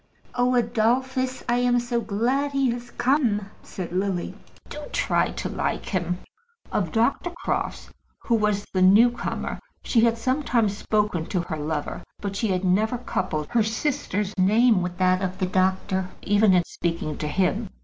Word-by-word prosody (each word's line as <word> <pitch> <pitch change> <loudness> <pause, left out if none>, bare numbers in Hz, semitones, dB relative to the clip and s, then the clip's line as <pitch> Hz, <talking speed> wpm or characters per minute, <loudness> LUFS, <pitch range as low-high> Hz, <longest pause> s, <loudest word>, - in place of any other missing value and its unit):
"Oh, 250 0 +2
Adolphus, 250 +3 0
I 240 0 +2
am 245 0 +3
so 240 0 -1
glad 245 +7 0
he 270 -3 +2
has 240 0 -6
come," 235 -8 +1
said 180 -3 -7
Lily. 185 -1 -1 0.3
"Do 300 - -7
try - - +1
to - - -4
like - - -2
him." 180 -2 -1 0.5
Of 180 -6 -1
Dr. 235 +9 +1 0.2
Crofts, - - -2 0.3
who 235 - 0
was 210 -2 +1
the 185 - +1
new 210 +6 +7
comer, 240 - -4 0.2
she 230 - +2
had 230 0 +3
sometimes 235 -4 +1
spoken 210 -6 0
to 180 - -1
her 165 -2 -5
lover, 150 0 -3 0.2
but 200 -1 -4
she 220 - 0
had 185 -1 0
never 215 +6 +2
coupled 185 -10 -2
her 240 -1 +2
sister's 220 -3 -1
name 215 +2 +4
with 175 0 -4
that 185 0 +3
of 190 -1 -2
the 185 - 0
doctor, 190 0 0
even 205 -1 +4
in 175 - +4
speaking 165 -3 -3
to 150 - -2
him. 190 +6 0
210 Hz, 165 wpm, -24 LUFS, 185-240 Hz, 0.5 s, new